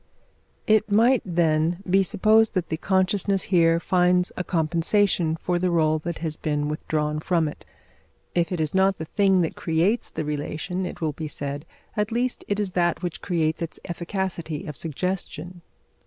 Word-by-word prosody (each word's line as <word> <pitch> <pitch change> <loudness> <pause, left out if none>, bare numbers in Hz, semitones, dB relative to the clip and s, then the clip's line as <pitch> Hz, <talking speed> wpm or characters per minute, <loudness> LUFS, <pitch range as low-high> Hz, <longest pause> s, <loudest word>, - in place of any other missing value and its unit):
It 215 0 +3
might, 230 +4 +4
then, 170 0 +1
he 190 +2 +4
supposed 215 +3 +3
that 180 -2 -1
the 160 - -1
consciousness 190 +2 +1
here 165 -1 +5
finds 180 0 +2
a 180 - -2
compensation 170 +1 +1
for 175 +2 -1
the 185 - +1
rôle 155 -3 +2
that 170 +1 -4
has 155 -1 -3
been 150 -1 -1
withdrawn 150 0 -2
from 165 0 +1
it. 150 - -9 0.7
If 170 -1 +1
it 180 - -2
is 155 -1 0
not 190 0 +3
the 160 - -5
thing 195 +1 +3
that 165 - -1
creates 175 +8 0
the 155 - -4
relation, 155 +5 -3
it - - -9
will 155 -2 0
be 155 +2 -5
said, 145 +1 -4 0.3
at 210 +1 -1
least 245 +2 -1
it 205 0 -1
is 200 -3 -1
that 175 0 0
which 175 -4 -4
creates 160 -4 0
its 165 - -5
efficacity 170 -3 -4
of 150 - -6
suggestion. 175 +2 -4
175 Hz, 170 wpm, -24 LUFS, 160-190 Hz, 0.7 s, here